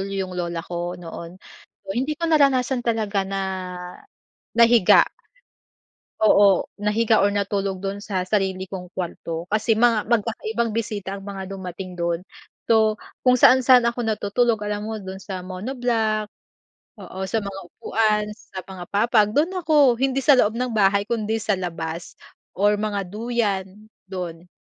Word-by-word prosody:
yung 190 Hz, -1 st, -3 dB
lola 170 Hz, -1 st, -2 dB
ko 175 Hz, 0 st, -4 dB
noon. 170 Hz, +1 st, -8 dB, 0.5 s
So 195 Hz, -, -5 dB
hindi 280 Hz, +5 st, -1 dB
ko 335 Hz, -, -8 dB
naranasan 265 Hz, -4 st, +3 dB
talaga 215 Hz, -4 st, 0 dB
na 195 Hz, 0 st, -2 dB, 1.2 s
nahiga 235 Hz, -4 st, +6 dB, 1.2 s
oo 200 Hz, -3 st, +5 dB
nahiga 215 Hz, +1 st, +2 dB
or 205 Hz, -, +2 dB
natulog 200 Hz, -2 st, -1 dB
dun 200 Hz, +1 st, -4 dB
sa 190 Hz, -3 st, -2 dB
sarili 190 Hz, -2 st, 0 dB
kong 180 Hz, -2 st, -8 dB
kwarto, 170 Hz, -1 st, -5 dB
kasi 215 Hz, +2 st, +2 dB
mga 230 Hz, -2 st, +3 dB
magkakaibang 225 Hz, 0 st, 0 dB
bisita 205 Hz, -3 st, -3 dB
ang 195 Hz, -, -10 dB
mga 195 Hz, -2 st, -6 dB
dumating 185 Hz, -1 st, -7 dB
dun. 170 Hz, 0 st, -1 dB, 0.5 s
So, 220 Hz, -1 st, +4 dB, 0.3 s
kung 250 Hz, 0 st, +6 dB
saan-saan 255 Hz, -1 st, +7 dB
ako 240 Hz, +1 st, -3 dB
natutulog 220 Hz, +1 st, +1 dB
alam 210 Hz, 0 st, -3 dB
mo, 220 Hz, -1 st, -4 dB
dun 190 Hz, 0 st, -7 dB
sa 185 Hz, -1 st, -5 dB
monoblock, 220 Hz, +1 st, -1 dB, 0.7 s
oo 190 Hz, -, -10 dB
sa 225 Hz, -, 0 dB
mga 200 Hz, -1 st, -6 dB
upuan, 215 Hz, +1 st, 0 dB
sa 190 Hz, -3 st, -9 dB
mga 185 Hz, -2 st, -8 dB
papag 215 Hz, 0 st, +3 dB
dun 310 Hz, +5 st, +3 dB
ako, 300 Hz, -8 st, +4 dB
hindi 270 Hz, 0 st, +1 dB
sa 285 Hz, -3 st, +7 dB
loob 215 Hz, 0 st, +3 dB
ng 250 Hz, 0 st, -1 dB
bahay 200 Hz, -1 st, +3 dB
kundi 225 Hz, -1 st, -1 dB
sa 205 Hz, -2 st, +1 dB
labas, 165 Hz, -2 st, -5 dB, 0.4 s
or 205 Hz, +2 st, +3 dB
mga 210 Hz, -1 st, -1 dB
duyan, 210 Hz, -2 st, -1 dB, 0.4 s
dun. 180 Hz, -2 st, -6 dB
205 Hz, 145 wpm, -23 LUFS, 190-230 Hz, 1.2 s, saan-saan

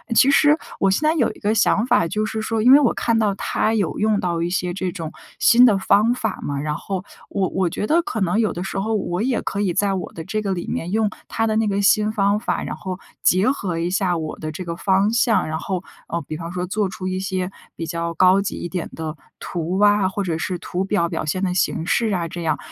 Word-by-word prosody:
其 270 Hz, +4 st, +6 dB
实 295 Hz, +2 st, +5 dB, 0.2 s
我 195 Hz, -, +3 dB
现 190 Hz, -, +1 dB
在 310 Hz, -, +4 dB
有 255 Hz, -8 st, +2 dB
一 -, -, -17 dB
个 210 Hz, +1 st, +1 dB
想 225 Hz, 0 st, +3 dB
法 170 Hz, -8 st, +3 dB
就 215 Hz, +5 st, -1 dB
是 220 Hz, +1 st, -3 dB
说， 220 Hz, 0 st, -1 dB
因 250 Hz, -, +7 dB
为 280 Hz, -, +9 dB
我 270 Hz, -5 st, +3 dB
看 230 Hz, -1 st, +1 dB
到 205 Hz, -3 st, +1 dB
他 220 Hz, +2 st, 0 dB
有 200 Hz, -6 st, -1 dB
用 215 Hz, -1 st, +2 dB
到 170 Hz, -3 st, -1 dB
一 170 Hz, -, 0 dB
些 180 Hz, -1 st, -1 dB
这 185 Hz, -1 st, -2 dB
种 165 Hz, -2 st, -6 dB, 0.3 s
新 245 Hz, +1 st, +6 dB
的 225 Hz, -5 st, +6 dB
方 210 Hz, +4 st, +3 dB
法 220 Hz, -5 st, -3 dB
嘛， 140 Hz, -1 st, -3 dB
然 150 Hz, +1 st, -2 dB
后 190 Hz, +2 st, -4 dB, 0.3 s
我 195 Hz, -2 st, 0 dB
我 185 Hz, -2 st, 0 dB
觉 185 Hz, -, -3 dB
得 325 Hz, +9 st, +3 dB
可 225 Hz, -, -4 dB
能 190 Hz, +2 st, +1 dB
有 220 Hz, -2 st, +2 dB
的 175 Hz, -, -4 dB
时 195 Hz, 0 st, -3 dB
候 220 Hz, +3 st, -1 dB
我 185 Hz, -2 st, -2 dB
也 245 Hz, 0 st, 0 dB
可 200 Hz, -, -2 dB
以 190 Hz, -4 st, 0 dB
在 200 Hz, +2 st, +1 dB
我 185 Hz, -2 st, -4 dB
的 165 Hz, -, -7 dB
这 215 Hz, +5 st, -2 dB
个 200 Hz, -2 st, -1 dB
里 175 Hz, -2 st, -4 dB
面 170 Hz, -, -3 dB
用 220 Hz, +1 st, +2 dB, 0.2 s
他 225 Hz, -, -1 dB
的 220 Hz, -1 st, 0 dB
那 220 Hz, -1 st, +2 dB
个 200 Hz, 0 st, 0 dB
新 210 Hz, +1 st, +4 dB
方 205 Hz, -1 st, +1 dB
法， 235 Hz, -, -2 dB
然 -, -, -4 dB
后 185 Hz, -1 st, -6 dB, 0.2 s
结 190 Hz, +7 st, +4 dB
合 190 Hz, -11 st, -3 dB
一 170 Hz, +1 st, -1 dB
下 185 Hz, -2 st, +1 dB
我 155 Hz, -1 st, -5 dB
的 155 Hz, 0 st, -4 dB
这 180 Hz, +4 st, -7 dB
个 170 Hz, 0 st, -4 dB
方 195 Hz, +3 st, +2 dB
向， 230 Hz, -5 st, +2 dB
然 155 Hz, 0 st, -3 dB
后， 185 Hz, +1 st, -3 dB, 0.2 s
呃， 170 Hz, -, -2 dB
比 155 Hz, -, -6 dB
方 165 Hz, +1 st, -6 dB
说 180 Hz, 0 st, -3 dB
做 200 Hz, +2 st, -1 dB
出 185 Hz, 0 st, -6 dB
一 185 Hz, 0 st, -2 dB
些 190 Hz, -1 st, -2 dB, 0.2 s
比 165 Hz, -, -4 dB
较 170 Hz, 0 st, -3 dB
高 185 Hz, +3 st, +5 dB
级 200 Hz, -, -3 dB
一 175 Hz, -, -5 dB
点 180 Hz, -1 st, -4 dB
的 160 Hz, -1 st, -5 dB, 0.2 s
图 175 Hz, +2 st, -3 dB
啊， 205 Hz, -1 st, +4 dB
或 200 Hz, +1 st, -2 dB
者 170 Hz, -4 st, -2 dB
是 180 Hz, +2 st, -3 dB
图 180 Hz, +3 st, -3 dB
表 190 Hz, -4 st, +1 dB
表 -, -, -3 dB
现 185 Hz, +5 st, -2 dB
的 180 Hz, -2 st, 0 dB
形 170 Hz, -2 st, 0 dB
式 220 Hz, +3 st, +1 dB
啊 175 Hz, -3 st, -1 dB
这 170 Hz, +1 st, -6 dB
样。 155 Hz, -2 st, 0 dB
190 Hz, 280 characters per minute, -21 LUFS, 175-215 Hz, 0.3 s, 为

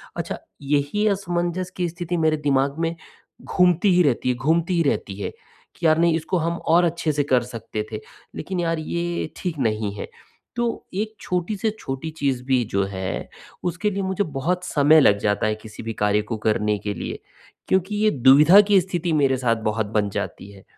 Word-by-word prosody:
अच्छा -, -, -4 dB, 0.2 s
यही 145 Hz, +9 st, 0 dB
असमंजस 180 Hz, -2 st, -1 dB
की 175 Hz, -2 st, 0 dB
स्थिति 175 Hz, +1 st, -4 dB
मेरे 155 Hz, -1 st, +2 dB
दिमाग 140 Hz, 0 st, +1 dB
में 165 Hz, +1 st, -2 dB, 0.5 s
घूमती 180 Hz, +1 st, +3 dB
ही 180 Hz, -, +5 dB
रहती 130 Hz, -2 st, +1 dB
है 125 Hz, -, +1 dB
घूमती 165 Hz, +7 st, +1 dB
ही 165 Hz, -, +3 dB
रहती 95 Hz, -, -3 dB
है, -, -, -2 dB, 0.5 s
कि 170 Hz, -, -5 dB
यार 155 Hz, 0 st, +5 dB
नहीं 170 Hz, -1 st, +3 dB
इसको 165 Hz, +3 st, -1 dB
हम 170 Hz, +1 st, -1 dB
और 175 Hz, +2 st, +3 dB
अच्छे 170 Hz, -2 st, 0 dB
से 145 Hz, 0 st, +1 dB
कर 125 Hz, -3 st, +2 dB
सकते 115 Hz, -3 st, -5 dB
थे, 110 Hz, -, -4 dB, 0.4 s
लेकिन 180 Hz, +3 st, -4 dB
यार 165 Hz, -1 st, 0 dB
ये 170 Hz, 0 st, -3 dB
ठीक 170 Hz, -4 st, -4 dB
नहीं 110 Hz, -4 st, 0 dB
है। -, -, -6 dB, 0.5 s
तो 240 Hz, 0 st, 0 dB, 0.3 s
एक 215 Hz, +3 st, -2 dB
छोटी 180 Hz, +3 st, -2 dB
से 220 Hz, +2 st, 0 dB
छोटी 135 Hz, +4 st, -5 dB
चीज़ 135 Hz, -4 st, 0 dB
भी 130 Hz, -2 st, +2 dB
जो 100 Hz, 0 st, +2 dB
है, 95 Hz, 0 st, -4 dB, 0.3 s
उसके 180 Hz, +4 st, -1 dB
लिए 195 Hz, 0 st, -2 dB
मुझे 190 Hz, +1 st, 0 dB
बहुत 165 Hz, +4 st, -2 dB
समय 155 Hz, 0 st, +5 dB
लग 100 Hz, -5 st, +5 dB
जाता 105 Hz, +1 st, +1 dB
है 110 Hz, -, 0 dB
किसी 110 Hz, 0 st, -11 dB
भी 115 Hz, 0 st, -4 dB
कार्य 105 Hz, 0 st, +1 dB
को 110 Hz, -, -1 dB
करने 105 Hz, -1 st, +1 dB
के 105 Hz, -1 st, -3 dB
लिए, -, -, -5 dB, 0.5 s
क्योंकि 190 Hz, +2 st, +1 dB
ये 215 Hz, 0 st, +3 dB
दुविधा 145 Hz, +10 st, +7 dB
की 200 Hz, -2 st, +6 dB
स्थिति 175 Hz, -2 st, -2 dB
मेरे 135 Hz, -3 st, +3 dB
साथ 120 Hz, -2 st, +1 dB
बहुत 110 Hz, 0 st, 0 dB
बन 105 Hz, -1 st, +1 dB
जाती 100 Hz, +1 st, -5 dB
है 95 Hz, -1 st, -15 dB
155 Hz, 195 wpm, -23 LUFS, 120-175 Hz, 0.5 s, दुविधा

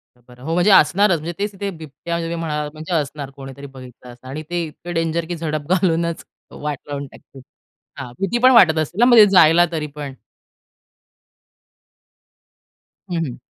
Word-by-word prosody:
बरं. 125 Hz, 0 st, -18 dB
हो. 160 Hz, +4 st, -3 dB
म्हणजे 180 Hz, +4 st, +3 dB
असणारच 190 Hz, +1 st, +4 dB
म्हणजे 165 Hz, +3 st, -6 dB
तेच 205 Hz, +1 st, -2 dB
तिथे 200 Hz, +1 st, -4 dB
बिबट्या 165 Hz, +1 st, -6 dB
जे 165 Hz, -, -4 dB
काही 165 Hz, +1 st, -3 dB
म्हणाला 150 Hz, -2 st, -3 dB
म्हणजे 155 Hz, +3 st, -6 dB
असणार 145 Hz, -3 st, -3 dB
कोणीतरी 135 Hz, 0 st, -10 dB
बघितलं 125 Hz, -1 st, -13 dB
असणार 120 Hz, +1 st, -14 dB
आणि 155 Hz, +3 st, -6 dB
ते 175 Hz, 0 st, -2 dB
इतकं 170 Hz, +3 st, -9 dB
डेंजर 165 Hz, 0 st, -1 dB
की 175 Hz, -, -3 dB
झडप 155 Hz, -3 st, -4 dB
घालूनच 170 Hz, -2 st, 0 dB, 0.3 s
वाट 150 Hz, -1 st, -5 dB
लावून 145 Hz, -1 st, -5 dB
टाकतील. 135 Hz, 0 st, -16 dB, 0.6 s
हां. 130 Hz, -3 st, -7 dB
भीती 195 Hz, +5 st, -1 dB
पण 255 Hz, -, +8 dB
वाटत 175 Hz, -10 st, +6 dB
असेल 155 Hz, +5 st, -4 dB
ना 240 Hz, -, +6 dB
म्हणजे 240 Hz, -4 st, +8 dB
जायला 170 Hz, -2 st, +6 dB
तरी 155 Hz, -2 st, -3 dB
पण? 145 Hz, -2 st, -6 dB, 3.0 s
हं, -, -, -1 dB
हं. 125 Hz, -4 st, -7 dB
160 Hz, 170 wpm, -20 LUFS, 145-175 Hz, 3.0 s, पण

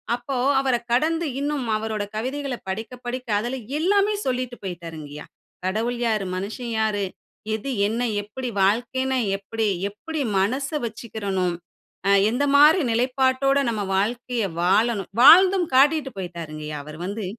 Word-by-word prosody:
அப்போ 250 Hz, +2 st, -4 dB, 0.2 s
அவர 265 Hz, -2 st, +1 dB, 0.2 s
கடந்து 320 Hz, +7 st, +2 dB
இன்னும் 285 Hz, -2 st, -2 dB
அவரோட 215 Hz, -1 st, -3 dB
கவிதைகள 265 Hz, +4 st, -3 dB
படிக்க 220 Hz, +4 st, -4 dB
படிக்க 250 Hz, +1 st, -4 dB
அதில 240 Hz, +4 st, -3 dB, 0.2 s
எல்லாமே 400 Hz, +5 st, +3 dB
சொல்லிட்டு 255 Hz, -1 st, -2 dB
போயிட்டார்ங்கையா. 160 Hz, -5 st, -7 dB, 0.4 s
"கடவுள் 225 Hz, +6 st, -1 dB
யாரு? 215 Hz, -4 st, 0 dB
மனுஷன் 220 Hz, +6 st, -5 dB
யாரு? 210 Hz, -2 st, 0 dB, 0.5 s
எது 220 Hz, +5 st, -5 dB, 0.2 s
என்ன? 230 Hz, +3 st, -2 dB, 0.2 s
எப்படி 245 Hz, +4 st, -6 dB
வாழ்க்கைன்னா 260 Hz, +6 st, +1 dB, 0.2 s
எப்படி? 220 Hz, +3 st, -2 dB, 0.2 s
எப்படி 310 Hz, +10 st, -5 dB, 0.2 s
மனச 260 Hz, +8 st, 0 dB, 0.2 s
வச்சுக்கிறணும்? 200 Hz, -5 st, -3 dB, 0.5 s
அ 200 Hz, -, +4 dB, 0.2 s
எந்த 250 Hz, +5 st, 0 dB
மாரி 305 Hz, +5 st, +7 dB
நிலைப்பாட்டோட 260 Hz, +3 st, +2 dB
நம்ம 215 Hz, -2 st, -2 dB
வாழ்க்கையை 230 Hz, 0 st, -1 dB
வாழணும்?" 200 Hz, +1 st, +2 dB
வாழ்ந்தும் 365 Hz, +4 st, +8 dB
காட்டிட்டு 285 Hz, 0 st, +4 dB
போயிட்டாருங்கையா. 155 Hz, -4 st, -6 dB
அவரு 155 Hz, +1 st, -10 dB
வந்து. 205 Hz, +2 st, -4 dB
235 Hz, 125 wpm, -23 LUFS, 200-265 Hz, 0.5 s, வாழ்ந்தும்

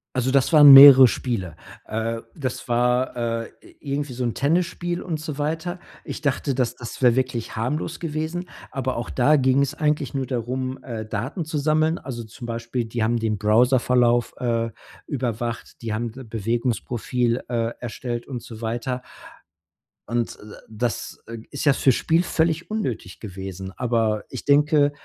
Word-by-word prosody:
Also, 130 Hz, 0 st, +1 dB
das 140 Hz, +4 st, +2 dB
waren 145 Hz, -3 st, +10 dB
mehrere 135 Hz, -1 st, +11 dB
Spiele. 100 Hz, -10 st, -3 dB, 0.3 s
Äh, 115 Hz, +1 st, -3 dB
das 130 Hz, -3 st, -4 dB
war, 125 Hz, +2 st, +1 dB
äh, 115 Hz, -1 st, -2 dB, 0.2 s
i -, -, -29 dB, 0.2 s
irgendwie 145 Hz, -2 st, -2 dB
so 125 Hz, +1 st, -4 dB
'n 120 Hz, -, -1 dB
Tennisspiel 175 Hz, +3 st, 0 dB
und 160 Hz, -4 st, -4 dB
so 150 Hz, -2 st, -6 dB
weiter. 160 Hz, +4 st, -2 dB, 0.3 s
Ich -, -, -6 dB
dachte, 140 Hz, -1 st, 0 dB
das 125 Hz, -2 st, -1 dB
das 120 Hz, +1 st, -9 dB
wäre 120 Hz, -2 st, +5 dB
wirklich 125 Hz, -3 st, -2 dB
harmlos 150 Hz, +8 st, -2 dB
gewesen. 165 Hz, +2 st, -3 dB, 0.2 s
Aber 130 Hz, -1 st, -3 dB
auch 120 Hz, -, -4 dB
da 145 Hz, +4 st, +3 dB
ging 130 Hz, +1 st, +3 dB
es 140 Hz, +2 st, -2 dB
eigentlich 150 Hz, -4 st, -1 dB
nur 135 Hz, -2 st, -2 dB
darum, 130 Hz, +1 st, -3 dB
äh, 115 Hz, -3 st, -5 dB
Daten 125 Hz, -, -4 dB
zu 160 Hz, 0 st, -3 dB
sammeln. 155 Hz, +3 st, +2 dB
Also, 120 Hz, -3 st, -7 dB
zum 115 Hz, +2 st, -10 dB
Beispiel, 115 Hz, +1 st, -3 dB
die 115 Hz, 0 st, -2 dB
haben 115 Hz, +2 st, +1 dB
den 110 Hz, -2 st, -1 dB
Browserverlauf, 120 Hz, +2 st, +3 dB
äh, 115 Hz, -2 st, -1 dB, 0.4 s
überwacht. 120 Hz, -4 st, -4 dB
Die 110 Hz, -2 st, -3 dB
haben 115 Hz, +1 st, -3 dB
d 130 Hz, -, -10 dB
Bewegungsprofil, 120 Hz, +2 st, -1 dB
äh, 115 Hz, -1 st, -1 dB
erstellt 120 Hz, 0 st, -5 dB
und 125 Hz, -4 st, -6 dB
so 115 Hz, -1 st, -10 dB
weiter. 120 Hz, +3 st, -3 dB, 1.1 s
Und, 120 Hz, 0 st, -2 dB
äh, -, -, -14 dB, 0.3 s
das, 115 Hz, +2 st, -3 dB
äh, 115 Hz, 0 st, -7 dB
ist 140 Hz, -, -4 dB
ja 145 Hz, -, +6 dB
fürs 130 Hz, -2 st, +3 dB
Spiel 165 Hz, +2 st, +2 dB
völlig 165 Hz, 0 st, 0 dB
unnötig 125 Hz, -, -4 dB
gewesen. 95 Hz, -2 st, -7 dB
Aber 115 Hz, -3 st, 0 dB
ich -, -, -7 dB
denke, 145 Hz, 0 st, +4 dB
125 Hz, 165 wpm, -23 LUFS, 115-145 Hz, 1.1 s, mehrere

